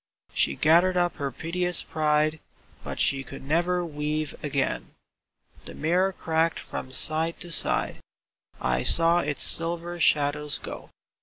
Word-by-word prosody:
She 70 - +2
gathered 175 - +3
up 175 -1 0
her 140 -3 -3
piteous 175 +5 0
pride, 155 0 0 0.4
But - - -7
she 135 0 +2
could 130 - -10
never 175 +5 0
weave 150 -1 -3
again. 135 - -3 0.7
The - - -9
mirror 180 +5 +1
cracked 165 -2 -1
from 130 - -7
side 160 +5 +2
to 175 - -4
side; - - 0 0.6
I 65 0 0
saw 165 - +5
Its 150 -4 +1
silver 170 +1 -1
shadows 150 -1 +2
go. - - -9
160 Hz, 135 wpm, -25 LUFS, 145-170 Hz, 0.7 s, saw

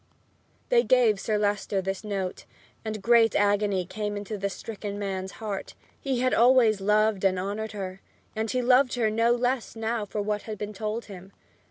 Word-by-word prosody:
They 485 -1 +5
gave 240 - +3
Sir 215 +1 0
Leicester 205 -1 0
this 195 +1 -3
note, 195 -3 -4 0.4
and 215 -2 -5
great 230 -1 +5
agony 205 -2 +2
came 205 +1 -4
to 215 +2 -5
the 200 0 -2
stricken 205 0 -6
man's 190 -1 -4
heart. 210 -3 -6 0.2
He 265 -3 -1
had 255 0 +2
always 235 -4 +5
loved 210 0 +2
and 190 -1 +3
honored 205 +3 -3
her, 190 -2 -6 0.3
and 220 +1 -2
he 250 +2 0
loved 255 +1 +4
her 225 -3 +1
no 230 +2 +2
less 245 0 0
now 225 -1 -2
for 210 - -4
what 210 0 -1
had 215 -1 -7
been 210 +1 -5
told 215 +3 -4
him. 195 -1 -11
210 Hz, 180 wpm, -26 LUFS, 200-230 Hz, 0.4 s, They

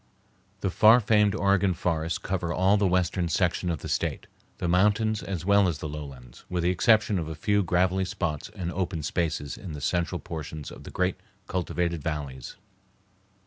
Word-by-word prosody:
The 95 - 0
far 110 +6 +7
famed 105 -2 +3
Oregon 100 -2 +2
forests 80 -1 -1
cover 90 -3 -3
all 95 +3 +3
the 100 -2 +2
western 90 -1 +1
section 90 +2 0
of 80 -4 -2
the - - -6
State, - - -2 0.3
the - - -2
mountains 105 +4 +2
as 90 -3 -5
well 100 -1 +5
as 85 -4 -1
the 80 - -5
lowlands, 70 -5 -9
with 90 -1 -1
the 90 - +3
exception 105 +1 +3
of 80 - -4
a 80 - -5
few 105 +6 +1
gravelly 90 +1 +1
spots 80 -5 -3
and 85 -2 -3
open 85 -4 -3
spaces 75 -2 -2
in 90 -5 -7
the 75 - -6
central 85 +2 -1
portions 80 -2 -7
of - - -12
the - - -7
great 90 0 0 0.3
cultivated 85 -2 -2
valleys. 70 -5 -5
90 Hz, 180 wpm, -27 LUFS, 80-95 Hz, 0.3 s, far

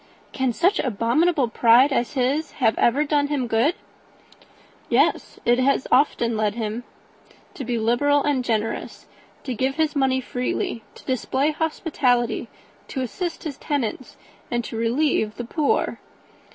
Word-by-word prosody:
"Can 260 -2 0
such 370 - +2
abominable 255 - +1
pride 240 +4 +5
as 240 -2 0
his 280 +4 0
have 225 -5 +2
ever 270 +5 +3
done 290 -1 +1
him 285 -3 -1
good?" 235 - +2 1.1
"Yes; - - +1
it 240 +1 +3
has 265 +1 +2
often 235 -4 +3
led 215 -1 0
him 225 +1 -4 0.7
to 275 - -6
be 240 -1 -2
liberal 270 +6 +2
and 280 -4 +1
generous; 225 -2 -3 0.4
to 260 - -3
give 260 +4 -1
his 315 -1 0
money 265 -2 +2
freely, 250 -2 -3
to - - -15
display 265 +3 0
hospitality, 255 -8 0 0.4
to 265 - -4
assist 335 - -4
his 295 -5 -6
tenants, 260 -3 -3 0.3
and 240 -1 -2
relieve 230 -1 0
the 240 - -5
poor. 295 +4 0
260 Hz, 140 wpm, -23 LUFS, 235-290 Hz, 1.1 s, pride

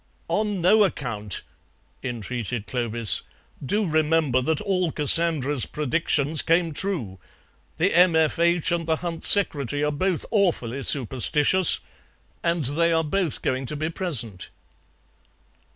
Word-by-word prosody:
"On 210 -3 -2
no 210 +5 +4
account," 110 - -4 0.6
entreated 120 -2 -5
Clovis; 115 -1 +1 0.4
"do 205 +10 0
remember 155 -4 +1
that 155 +4 -1
all 185 -5 -1
Cassandra's 150 -3 +5
predictions 150 0 0
came 165 +1 0
true. 145 - -5 0.6
The 180 +5 0
M.F.H. 170 0 +2
and 170 -1 -2
the 160 - +1
Hunt 165 -1 -5
Secretary 145 - +2
are 150 - 0
both 180 +3 -2
awfully 160 - -1
superstitious, 145 - +2 0.6
and 170 -3 -1
they 165 +6 0
are 165 0 +1
both 165 0 -3
going 130 0 -2
to 150 - -3
be 155 +2 -4
present." 120 - 0
155 Hz, 120 wpm, -23 LUFS, 130-170 Hz, 0.6 s, Cassandra's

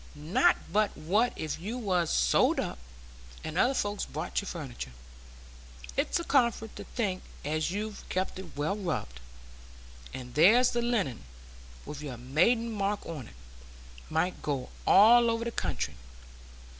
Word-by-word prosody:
Not 165 - +3 0.2
but 210 0 +2
what 210 +10 +2
if 155 -1 -4
you 215 +8 -4
was 185 -8 0
sold 65 -1 +3
up, - - -3 0.6
and 155 - -5
other 250 +9 +3
folks 205 -3 -1
bought 155 +7 -3
your 200 - -9
furniture, 130 - -6 1.0
it's - - +1
a - - -3
comfort 235 -7 +1
to - - -7
think 195 -6 -2 0.2
as 155 +2 0
you've 210 +3 -4
kept 185 0 -2
it 175 -6 -10
well 150 +7 0
rubbed. 165 - -3 0.9
And 125 -1 -8
there's 220 - +6
the 240 - 0
linen, 210 - -1 0.6
with 150 0 -7
your 135 -5 -6
maiden 180 - +2
mark 205 -1 -1
on, 150 -8 -6 0.8
might 160 +3 0
go 140 -4 -2 0.2
all 235 +4 +7
over 230 0 -1
the 235 - -2
country. 70 - -2
185 Hz, 145 wpm, -29 LUFS, 150-225 Hz, 1.0 s, all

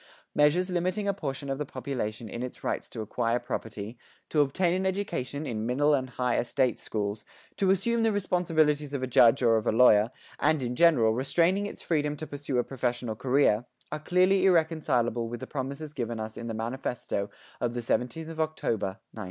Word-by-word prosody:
Measures 175 +6 +3
limiting 185 +3 0
a 200 - +2
portion 140 -6 -4
of 135 0 -2
the - - 0
population 125 -5 -4
in 120 - -6
its 125 0 -6
rights - - -2
to 115 - -6
acquire 115 +2 0
property, 115 -2 -5 0.3
to 150 - +3
obtain 170 +5 +1
an 185 +1 0
education 175 -7 -2
in 110 -5 -3
middle 140 +6 +2
and 130 -2 0
higher 125 -1 0
state 125 0 0
schools, 105 -1 -3 0.3
to 195 - +1
assume 230 +5 +2
the 225 0 +3
responsibilities 160 -7 +1
of 130 - -3
a - - +2
judge 125 0 +5
or 115 -2 +5
of 110 - -2
a - - +4
lawyer, 110 -2 +6 0.3
and, 155 -4 +2
in 125 0 -2
general, 125 -9 +5
restraining 170 - +2
its - - -9
freedom 150 -2 0
to 155 - -5
pursue 145 -3 -4
a 120 - +3
professional 120 -3 -2
career 125 -2 +2 0.3
are 150 - -3
clearly 185 +4 +3
irreconcilable 155 - +2
with 120 0 -5
the - - -6
promises 140 +2 -5
given 120 -4 -3
us 110 0 -5
in 115 - -6
the 115 - -3
manifesto 115 -3 -3 0.3
of 120 0 -1
the - - -1
17th 125 +6 -1
of 160 -1 -8
October, 115 -11 -1 0.2
1906. - - -10
135 Hz, 195 wpm, -28 LUFS, 120-160 Hz, 0.3 s, lawyer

